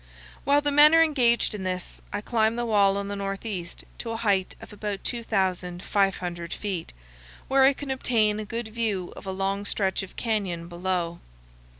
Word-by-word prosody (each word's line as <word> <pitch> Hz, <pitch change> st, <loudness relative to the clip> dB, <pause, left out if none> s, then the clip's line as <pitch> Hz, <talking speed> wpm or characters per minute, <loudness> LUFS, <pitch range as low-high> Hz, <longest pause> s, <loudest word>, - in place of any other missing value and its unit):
While 285 Hz, +2 st, +4 dB
the 290 Hz, 0 st, 0 dB
men 295 Hz, +2 st, +8 dB
are 330 Hz, -, +8 dB
engaged 245 Hz, -8 st, +2 dB
in 210 Hz, -, -5 dB
this 185 Hz, -1 st, -4 dB
I 205 Hz, -, -2 dB
climb 220 Hz, 0 st, +1 dB
the 240 Hz, 0 st, -1 dB
wall 200 Hz, -3 st, +4 dB
on 200 Hz, 0 st, -3 dB
the 200 Hz, -, -3 dB
northeast 195 Hz, -2 st, -4 dB, 0.2 s
to 235 Hz, -, -4 dB
a 225 Hz, -, -2 dB
height 200 Hz, -4 st, +1 dB
of -, -, -12 dB
about 205 Hz, -1 st, -4 dB
2,500 185 Hz, -4 st, -1 dB
feet, 190 Hz, -, -4 dB, 0.5 s
where 270 Hz, 0 st, +4 dB
I 275 Hz, -, +6 dB
can 275 Hz, 0 st, -6 dB
obtain 220 Hz, -5 st, +1 dB
a -, -, -3 dB
good 230 Hz, +1 st, -5 dB
view 215 Hz, -5 st, -2 dB
of -, -, -10 dB
a -, -, -1 dB
long 195 Hz, +1 st, -1 dB
stretch 195 Hz, -1 st, 0 dB
of 195 Hz, -, -9 dB
canyon 195 Hz, -7 st, -2 dB
below. 175 Hz, -1 st, -2 dB
205 Hz, 180 wpm, -26 LUFS, 190-235 Hz, 0.5 s, men